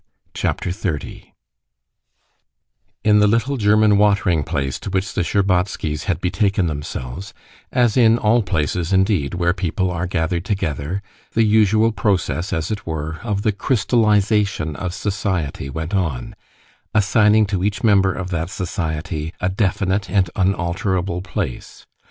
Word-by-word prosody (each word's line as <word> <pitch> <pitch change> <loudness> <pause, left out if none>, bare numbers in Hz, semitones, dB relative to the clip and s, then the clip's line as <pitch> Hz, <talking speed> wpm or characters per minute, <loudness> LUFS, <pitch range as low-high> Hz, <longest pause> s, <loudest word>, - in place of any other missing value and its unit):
Chapter 90 - -2
30 90 -6 -5 1.7
In 105 -1 +5
the 105 - +5
little 115 +6 +1
German 105 -2 +4
watering 100 -5 +3
place 70 -1 -2
to - - -6
which 95 +1 -1
the - - 0
Shtcherbatskys 90 -5 0
had 85 -5 -1
betaken 95 +2 +1
themselves, 75 +3 -5 0.4
as 120 -4 +2
in 115 -2 +5
all 115 +1 +3
places 85 -2 -1
indeed 95 -6 +2
where 85 0 +1
people 90 0 -1
are 90 +1 -2
gathered 85 -1 -1
together, 95 -2 -2 0.3
the 115 - +3
usual 110 +1 +4
process, 90 -6 -1
as 80 +3 -2
it 105 -4 -4
were, 80 0 -4
of 105 -4 -2
the 110 - +3
crystallization 105 - +1
of 90 +2 -4
society 95 -9 -2
went 80 +6 -5
on, 80 -11 -1 0.6
assigning 105 +1 +4
to 95 -2 -2
each 100 +2 -1
member 100 -4 +4
of 95 0 -5
that 85 0 -2
society 80 -4 -3
a 90 - 0
definite 95 0 0
and 95 -4 +1
unalterable 90 -1 0
place. 80 -8 -5
95 Hz, 135 wpm, -20 LUFS, 85-105 Hz, 1.7 s, In